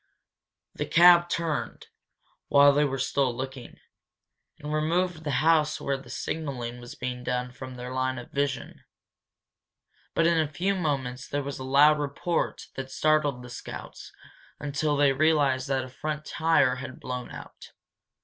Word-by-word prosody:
The -, -, -4 dB
cab 175 Hz, 0 st, +7 dB
turned, 165 Hz, -3 st, -2 dB, 0.6 s
while 140 Hz, 0 st, +6 dB
they 145 Hz, +1 st, +3 dB
were 135 Hz, -1 st, -2 dB
still 135 Hz, 0 st, +1 dB
looking, 130 Hz, -1 st, -7 dB, 0.8 s
and 150 Hz, +1 st, -6 dB
removed 165 Hz, +2 st, 0 dB
the 150 Hz, -, -3 dB, 0.2 s
house 160 Hz, -2 st, +3 dB
where 140 Hz, -, -1 dB
the 135 Hz, -2 st, -10 dB
signalling 125 Hz, -6 st, -4 dB
was 120 Hz, 0 st, -10 dB
being 125 Hz, 0 st, -5 dB
done 125 Hz, 0 st, -2 dB
from 130 Hz, 0 st, -9 dB
their 125 Hz, +1 st, -7 dB
line 130 Hz, 0 st, -1 dB
of 120 Hz, -, -9 dB
vision. 140 Hz, -3 st, -3 dB, 1.3 s
But 165 Hz, -, +3 dB
in 170 Hz, -1 st, +3 dB
a 155 Hz, -2 st, 0 dB
few 185 Hz, +6 st, 0 dB
moments 135 Hz, -8 st, -2 dB
there 145 Hz, 0 st, -2 dB
was 140 Hz, 0 st, -5 dB
a -, -, -5 dB
loud 145 Hz, +3 st, +5 dB
report 150 Hz, +4 st, -2 dB
that 135 Hz, 0 st, -6 dB
startled 145 Hz, -2 st, +1 dB
the 125 Hz, -, -10 dB
scouts -, -, -9 dB, 0.5 s
until 145 Hz, +1 st, -1 dB
they 140 Hz, -1 st, +4 dB
realized 140 Hz, -3 st, +2 dB
that 135 Hz, -1 st, 0 dB
a -, -, -10 dB
front 150 Hz, +4 st, -5 dB
tire 160 Hz, -5 st, +2 dB
had 130 Hz, 0 st, -8 dB
blown 125 Hz, -1 st, -5 dB
out. -, -, -11 dB
140 Hz, 155 wpm, -27 LUFS, 130-155 Hz, 1.3 s, cab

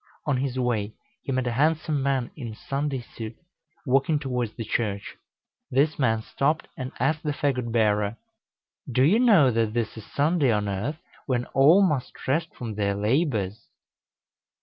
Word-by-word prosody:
On 145 Hz, -3 st, +1 dB
his 130 Hz, -1 st, -2 dB
way 110 Hz, -4 st, 0 dB, 0.3 s
he 135 Hz, -, -4 dB
met 130 Hz, -1 st, 0 dB
a 120 Hz, -, 0 dB
handsome 150 Hz, +3 st, +1 dB
man 135 Hz, -3 st, 0 dB
in 115 Hz, -7 st, -7 dB
Sunday 140 Hz, +1 st, -3 dB
suit, 115 Hz, -1 st, -8 dB, 0.5 s
walking 135 Hz, +4 st, +2 dB
towards 125 Hz, -6 st, -2 dB
the 115 Hz, -, -5 dB
Church; 100 Hz, -4 st, -2 dB, 0.5 s
this 145 Hz, +4 st, +2 dB
man 110 Hz, -4 st, +2 dB
stopped 150 Hz, +7 st, 0 dB
and 130 Hz, -1 st, -5 dB
asked 150 Hz, +5 st, +1 dB
the 150 Hz, -3 st, -1 dB
fagot 130 Hz, -5 st, -1 dB
bearer, 105 Hz, -1 st, +1 dB, 0.7 s
"Do 125 Hz, +2 st, +3 dB
you 185 Hz, +11 st, +5 dB
know 200 Hz, -, +6 dB
that 115 Hz, -2 st, 0 dB
this 115 Hz, -2 st, -2 dB
is 110 Hz, -, -8 dB
Sunday 145 Hz, -2 st, +2 dB
on 105 Hz, -1 st, 0 dB
earth, 105 Hz, +10 st, -2 dB, 0.3 s
when 125 Hz, -3 st, 0 dB
all 155 Hz, +9 st, +6 dB
must 145 Hz, -9 st, -2 dB
rest 155 Hz, +5 st, +1 dB
from 115 Hz, -3 st, -5 dB
their 100 Hz, -1 st, 0 dB
labors?" 110 Hz, -, 0 dB
130 Hz, 160 wpm, -25 LUFS, 110-145 Hz, 0.7 s, know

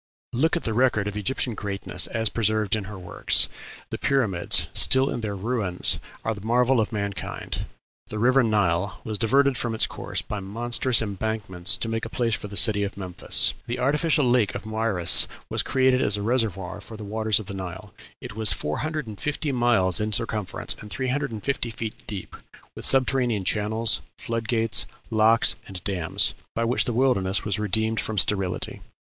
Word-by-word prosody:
Look 160 Hz, +8 st, +1 dB
at -, -, -5 dB
the 110 Hz, -, -2 dB
record 110 Hz, -4 st, +2 dB
of 105 Hz, -, -4 dB
Egyptian 115 Hz, +4 st, -1 dB
greatness 100 Hz, -1 st, -4 dB
as 115 Hz, -1 st, 0 dB
preserved 110 Hz, 0 st, 0 dB
in 105 Hz, -3 st, -4 dB
her 105 Hz, 0 st, -8 dB
works: 90 Hz, -2 st, +3 dB, 0.4 s
The -, -, -4 dB
pyramids, 110 Hz, -11 st, +1 dB
still 130 Hz, +1 st, +4 dB
in 120 Hz, -, -4 dB
their 105 Hz, -2 st, -3 dB
ruins, 100 Hz, -3 st, 0 dB, 0.3 s
are 110 Hz, -, 0 dB
the 105 Hz, -2 st, -10 dB
marvel 125 Hz, +2 st, +2 dB
of 110 Hz, -, 0 dB
mankind. 100 Hz, -2 st, -4 dB, 0.4 s
The 110 Hz, -, -6 dB
river 130 Hz, +4 st, +4 dB
Nile 100 Hz, -3 st, 0 dB
was 110 Hz, -2 st, -4 dB
diverted 135 Hz, +3 st, +3 dB
from 115 Hz, -3 st, -2 dB
its 110 Hz, -, +5 dB
course -, -, -5 dB
by 105 Hz, -, -5 dB
monstrous 120 Hz, +5 st, 0 dB
embankments 100 Hz, -3 st, -1 dB
to -, -, -3 dB
make 115 Hz, 0 st, -3 dB
a 110 Hz, -, -4 dB
place 115 Hz, -1 st, -1 dB
for 105 Hz, -, -3 dB
the 100 Hz, 0 st, -2 dB
city 105 Hz, -3 st, +5 dB
of 100 Hz, 0 st, -3 dB
Memphis. 90 Hz, -3 st, +3 dB
The 120 Hz, +1 st, -3 dB
artificial 150 Hz, +3 st, +2 dB
lake 120 Hz, -5 st, +2 dB
of -, -, -6 dB
Moeris 110 Hz, -5 st, +3 dB, 0.2 s
was -, -, 0 dB
created 130 Hz, -1 st, +2 dB
as 105 Hz, -, +2 dB
a 100 Hz, -, -4 dB
reservoir 105 Hz, -5 st, -1 dB
for 110 Hz, +2 st, -10 dB
the 105 Hz, -, -8 dB
waters 110 Hz, 0 st, 0 dB
of 110 Hz, -, -8 dB
the 100 Hz, -, -6 dB
Nile: 95 Hz, -3 st, -7 dB, 0.3 s
it -, -, -9 dB
was 110 Hz, -2 st, +4 dB
four 75 Hz, +1 st, -3 dB
hundred 155 Hz, -1 st, -3 dB
and 105 Hz, -2 st, -9 dB
fifty 150 Hz, 0 st, -2 dB
miles 120 Hz, -7 st, +4 dB
in 105 Hz, 0 st, -2 dB
circumference 105 Hz, -2 st, -1 dB
and 105 Hz, -, -10 dB
three 130 Hz, +3 st, -3 dB
hundred 145 Hz, 0 st, -1 dB
and 110 Hz, -2 st, -7 dB
fifty 135 Hz, -4 st, -1 dB
feet 110 Hz, -1 st, -7 dB
deep, 100 Hz, -3 st, -5 dB, 0.4 s
with -, -, -7 dB
subterranean 125 Hz, -5 st, +3 dB
channels, 110 Hz, +3 st, +2 dB, 0.2 s
flood 115 Hz, -1 st, -4 dB
gates, 115 Hz, -2 st, +1 dB, 0.2 s
locks, 110 Hz, +1 st, +4 dB
and 95 Hz, -3 st, -9 dB
dams, 90 Hz, -5 st, +2 dB, 0.2 s
by 115 Hz, -, 0 dB
which 120 Hz, +2 st, +1 dB
the -, -, -1 dB
wilderness 105 Hz, -7 st, +1 dB
was 105 Hz, 0 st, -1 dB
redeemed 110 Hz, +2 st, 0 dB
from 110 Hz, -, -3 dB
sterility. 95 Hz, -2 st, 0 dB
110 Hz, 190 wpm, -24 LUFS, 100-120 Hz, 0.4 s, its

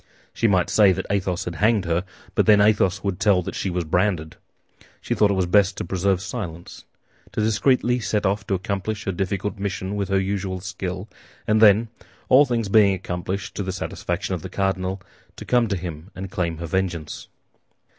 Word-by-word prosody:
She 115 Hz, -, +1 dB
might 95 Hz, -4 st, +2 dB
say 105 Hz, -3 st, +6 dB
that 95 Hz, +1 st, -4 dB
Athos 95 Hz, -3 st, -1 dB
had 85 Hz, -, -4 dB
hanged 105 Hz, -1 st, +2 dB
her; 85 Hz, +1 st, 0 dB, 0.3 s
but -, -, +2 dB
then 105 Hz, -1 st, +7 dB
Athos 100 Hz, -3 st, +3 dB
would 100 Hz, -2 st, -2 dB
tell 95 Hz, -4 st, +3 dB
that -, -, -5 dB
she 95 Hz, -, -2 dB
was 90 Hz, -1 st, -1 dB
branded. 85 Hz, -1 st, 0 dB, 0.6 s
She -, -, -2 dB
thought 105 Hz, -, +3 dB
it 100 Hz, -, +1 dB
was 95 Hz, -1 st, +1 dB
best 95 Hz, +1 st, +3 dB
to -, -, -3 dB
preserve 95 Hz, +1 st, 0 dB
silence, 85 Hz, -9 st, -7 dB, 0.5 s
to -, -, -3 dB
discreetly 125 Hz, +3 st, +2 dB
set 105 Hz, -2 st, -1 dB
off 100 Hz, +1 st, 0 dB
to 100 Hz, -, +1 dB
accomplish 100 Hz, +3 st, -3 dB
her 95 Hz, -, -1 dB
difficult 95 Hz, +3 st, -3 dB
mission 95 Hz, 0 st, -3 dB
with 100 Hz, -1 st, -2 dB
her 95 Hz, 0 st, +2 dB
usual 95 Hz, -1 st, -2 dB
skill; 95 Hz, +1 st, -5 dB, 0.4 s
and 110 Hz, 0 st, +2 dB
then, 110 Hz, +1 st, +6 dB, 0.4 s
all 140 Hz, +3 st, +7 dB
things 115 Hz, -4 st, -1 dB
being 100 Hz, -1 st, +5 dB
accomplished 95 Hz, +1 st, -4 dB
to -, -, -4 dB
the 95 Hz, -1 st, -2 dB
satisfaction 95 Hz, -, -3 dB
of -, -, -3 dB
the -, -, -7 dB
cardinal, 95 Hz, -1 st, -2 dB, 0.3 s
to -, -, -9 dB
come 120 Hz, -2 st, +3 dB
to 100 Hz, -2 st, -1 dB
him 85 Hz, 0 st, -7 dB
and 95 Hz, +1 st, -7 dB
claim 85 Hz, -3 st, -2 dB
her 85 Hz, -, -5 dB
vengeance. 85 Hz, -3 st, -3 dB
95 Hz, 195 wpm, -23 LUFS, 90-105 Hz, 0.6 s, then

